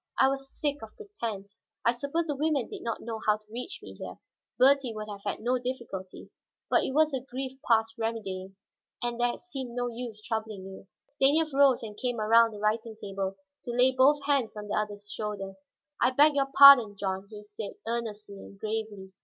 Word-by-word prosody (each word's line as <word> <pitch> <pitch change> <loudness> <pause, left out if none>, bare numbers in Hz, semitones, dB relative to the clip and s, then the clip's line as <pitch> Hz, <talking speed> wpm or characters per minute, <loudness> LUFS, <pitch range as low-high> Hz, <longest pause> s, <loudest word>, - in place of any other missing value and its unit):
I 265 - +5
was 270 0 -4
sick 290 0 -2
of 220 -1 -11
pretense. 225 - -7 0.3
I 235 - +5
suppose 280 +7 -2
the 295 -3 -2
women 290 -3 0
did - - -8
not 230 -2 -4
know 225 -1 -5
how 210 0 +4
to 215 0 -27
reach 250 - -6
me - - -9
here; - - -8 0.4
Bertie 265 -3 +4
would 215 0 -5
have 205 -1 -8
had - - -3
no 250 +2 +1
difficulty. 235 -7 -6 0.4
But - - +4
it - - -2
was 310 -1 +4
a 265 - -1
grief 265 +1 -6
past 225 0 +2
remedying, 195 -4 -4 0.5
and 240 0 -2
there 240 0 +1
seemed 265 -9 -7
no 245 0 -1
use 230 -2 -6
troubling 215 -3 -4
you." 190 0 -11 0.2
Stanief 295 +2 +2
rose 275 -3 +4
and 210 -2 -7
came 245 +1 -2
around 230 +2 +5
the 210 -2 -10
writing 220 +2 -1
table 195 -2 -4 0.3
to 240 - -4
lay 250 +1 +5
both 280 +3 +4
hands 275 -7 +1
on 210 0 -7
the - - -1
other's 205 -1 -3
shoulders. 195 -2 -6 0.3
"I 245 - +5
beg 290 +4 +5
your 275 -1 +1
pardon, 275 -8 +9
John," 195 0 -3
he 210 -1 -10
said 205 0 -8
earnestly 215 -3 -4
and 200 - -12
gravely. 215 -3 -4
230 Hz, 195 wpm, -28 LUFS, 210-265 Hz, 0.5 s, pardon